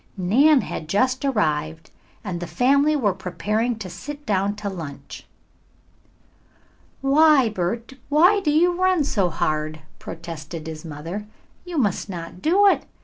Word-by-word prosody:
Nan 260 Hz, +11 st, +4 dB
had 155 Hz, -, -6 dB
just 255 Hz, -, +1 dB
arrived 160 Hz, -, -1 dB, 0.3 s
and 185 Hz, -5 st, -4 dB
the 175 Hz, -, -5 dB
family 275 Hz, -, +3 dB
were 215 Hz, -9 st, +1 dB
preparing 210 Hz, +5 st, -2 dB
to 205 Hz, -4 st, -7 dB
sit 290 Hz, +11 st, -8 dB
down 200 Hz, 0 st, 0 dB
to 210 Hz, 0 st, -6 dB
lunch. 145 Hz, -7 st, -8 dB, 1.7 s
"Why, 275 Hz, -2 st, +5 dB
Bert, 220 Hz, +6 st, -3 dB, 0.2 s
why 350 Hz, +8 st, +5 dB
do 345 Hz, -, -1 dB
you 350 Hz, +4 st, +2 dB
run 370 Hz, -4 st, +3 dB
so 200 Hz, -10 st, 0 dB
hard?" 155 Hz, -1 st, -2 dB, 0.2 s
protested 165 Hz, -1 st, -8 dB
his 160 Hz, -1 st, -7 dB
mother. 165 Hz, +7 st, -6 dB, 0.4 s
"You 350 Hz, -2 st, -5 dB
must 205 Hz, -6 st, 0 dB
not 175 Hz, 0 st, -7 dB
do 380 Hz, +6 st, +4 dB
it. 395 Hz, -, +3 dB
210 Hz, 140 wpm, -23 LUFS, -, 1.7 s, Why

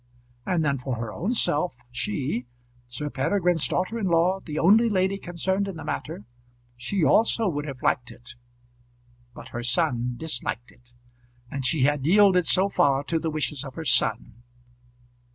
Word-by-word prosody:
And 170 Hz, -4 st, +1 dB
then 140 Hz, -2 st, 0 dB
for 130 Hz, 0 st, -3 dB
her 115 Hz, -2 st, -5 dB
own 220 Hz, +8 st, -2 dB
self, 150 Hz, -, 0 dB, 0.2 s
she, 125 Hz, +1 st, -3 dB, 0.4 s
Sir 145 Hz, +5 st, -5 dB
Peregrine's 175 Hz, +3 st, +1 dB
daughter 185 Hz, +6 st, -1 dB
in 200 Hz, -, -1 dB
law, 175 Hz, +2 st, +2 dB
the 155 Hz, -5 st, -7 dB
only 220 Hz, +8 st, +5 dB
lady 190 Hz, -1 st, 0 dB
concerned 190 Hz, +3 st, -2 dB
in 195 Hz, -, -5 dB
the 160 Hz, -, -8 dB
matter, 105 Hz, -, -5 dB, 0.5 s
she 155 Hz, +10 st, -2 dB
also 225 Hz, +5 st, +3 dB
would 145 Hz, -4 st, -2 dB
have 135 Hz, -3 st, -8 dB
liked 120 Hz, -1 st, +1 dB
it. 120 Hz, 0 st, -11 dB, 1.0 s
But -, -, -10 dB
her 120 Hz, -, -5 dB
son 125 Hz, 0 st, 0 dB
disliked 125 Hz, -5 st, -4 dB
it, 120 Hz, 0 st, -23 dB, 0.6 s
and 140 Hz, -1 st, -4 dB
she 155 Hz, +1 st, +1 dB
had 145 Hz, +1 st, +2 dB
yielded 190 Hz, -2 st, +5 dB
so 190 Hz, +2 st, +4 dB
far 140 Hz, -7 st, +2 dB
to 165 Hz, +2 st, -1 dB
the 160 Hz, -, -2 dB
wishes 150 Hz, -3 st, -2 dB
of 135 Hz, -2 st, -9 dB
her 165 Hz, -, -6 dB
son. 105 Hz, -, +1 dB
155 Hz, 165 wpm, -25 LUFS, 125-185 Hz, 1.0 s, only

